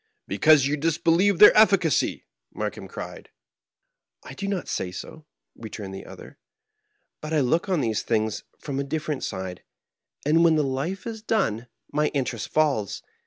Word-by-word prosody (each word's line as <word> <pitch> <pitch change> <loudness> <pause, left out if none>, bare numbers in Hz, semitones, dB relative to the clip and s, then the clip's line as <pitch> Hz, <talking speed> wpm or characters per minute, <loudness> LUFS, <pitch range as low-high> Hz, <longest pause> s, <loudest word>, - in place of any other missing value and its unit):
"Because 155 -3 +5
you 145 +2 0
disbelieve 165 +5 +2
their 210 - +9
efficacy 195 -7 +3 0.3
1" - - -13
Markheim - - -4
cried. - - -8 1.0
'•I 130 - -9
do 200 - -4
not 195 -3 -2
say 90 - -2
so," 90 - -9 0.3
returned 105 -3 -8
the 95 - -8
other; - - -12 0.8
"but 155 +1 -5
I 150 - +3
look 165 +9 +1
on 180 -5 +1
these 110 -4 0
things 110 -2 -1
from 140 -2 -5
a - - 0
different 150 0 -3
side, 95 -1 -5 0.6
and 160 +3 +4
when 165 -2 +5
the 155 - +2
life 140 +8 -3
is 225 -2 -6
done 125 - -1 0.2
my 150 0 +1
interest 125 -5 -2
falls. 140 -10 0
150 Hz, 160 wpm, -25 LUFS, 120-170 Hz, 1.0 s, their